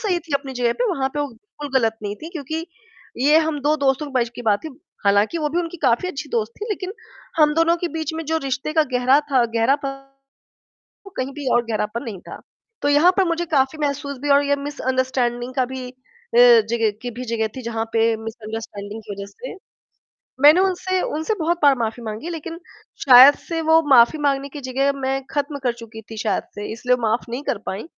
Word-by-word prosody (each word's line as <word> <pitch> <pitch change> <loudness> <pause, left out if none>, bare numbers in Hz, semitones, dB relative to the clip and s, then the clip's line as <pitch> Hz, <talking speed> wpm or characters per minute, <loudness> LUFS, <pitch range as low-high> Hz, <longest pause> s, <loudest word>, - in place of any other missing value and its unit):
सही 390 -6 0
थी 330 -3 -12
अपनी 275 -1 -2
जगह 245 -2 +1
पर, - - -2
वहाँ 270 -6 -1
पे 290 +2 -4
वो 290 - 0
बिल्कुल 295 - -11
ग़लत 225 -1 0
नहीं 205 0 -4
थी 320 - -6
क्योंकि 320 +1 -5 0.5
ये 295 +5 +5
हम 315 -2 -1
2 300 +2 +2
दोस्तों 280 0 0
के 285 - -10
बीच 235 -1 +1
की 245 - -7
बात 210 0 +1
थी, - - -4 0.4
हालाँकि 205 +10 +2
वो 300 - -1
भी 325 +4 -1
उनकी 340 0 -5
काफ़ी 255 +7 +2
अच्छी 300 -4 -6
दोस्त 225 -1 -1
थी 425 - -3
लेक़िन 380 -2 -3 0.4
हम 300 -1 +4
दोनों 330 +1 +3
के 350 - -1
बीच 320 -1 -4
में 325 0 -4
जो 320 +1 0
रिश्ते 270 +3 -2
का 315 0 +4
गहरा 250 +2 +4
था 255 -3 +4
गहरापन, 275 +5 +1 1.2
वो 395 - -12
कहीं 260 +1 -2
भी 285 -1 -6
और 240 - +3
गहरापन 225 +1 -3
नहीं 220 -7 -7
था, - - -10 0.4
तो 290 - +1
यहाँ 300 +5 +5
पर 385 - +5
मुझे 335 +1 -1
काफ़ी 270 +3 +2
महसूस 280 0 -3
भी 290 - -4
हुआ 280 - +5
और 285 - +2
यह 285 0 +2
मिसअंडरस्टैंडिंग 260 -3 -2
का 260 - +2
भी 260 0 -6
अ, - - -15 0.4
जगह 230 -2 +5
की 245 - -5
भी 250 +2 -7
जगह 225 -1 -1
थी 260 - -6
जहाँ 225 -1 -3
पे 225 0 +3
मिसअंडरस्टैंडिंग 220 -2 -7
की 205 - -9
वज़ह 200 0 -7
से - - -8 0.9
मैंने 300 +5 +8
उनसे 370 0 0
उनसे 315 +8 -2
बहुत 335 +2 0
बार 285 -1 +6
माफ़ी 230 +1 -3
माँगी 220 +10 -5
लेक़िन 330 0 -6 0.5
शायद 260 +2 +10
से 330 -1 -4
वो 320 +1 +5
माफ़ी 250 +4 +6
माँगने 280 -1 0
की 290 +1 -9
जगह 275 +2 +1
मैं 270 0 -1
ख़त्म 285 0 -2
कर 245 - +2
चुकी 220 -1 -10
थी 225 - -7
शायद 215 - -1
से 205 - -6
इसलिए 250 +2 +1
वो 245 - -9
माफ़ 225 +2 0
नहीं 245 +4 -4
कर 275 -6 -1
पाईं। 195 +3 -4
270 Hz, 220 wpm, -21 LUFS, 235-310 Hz, 1.2 s, शायद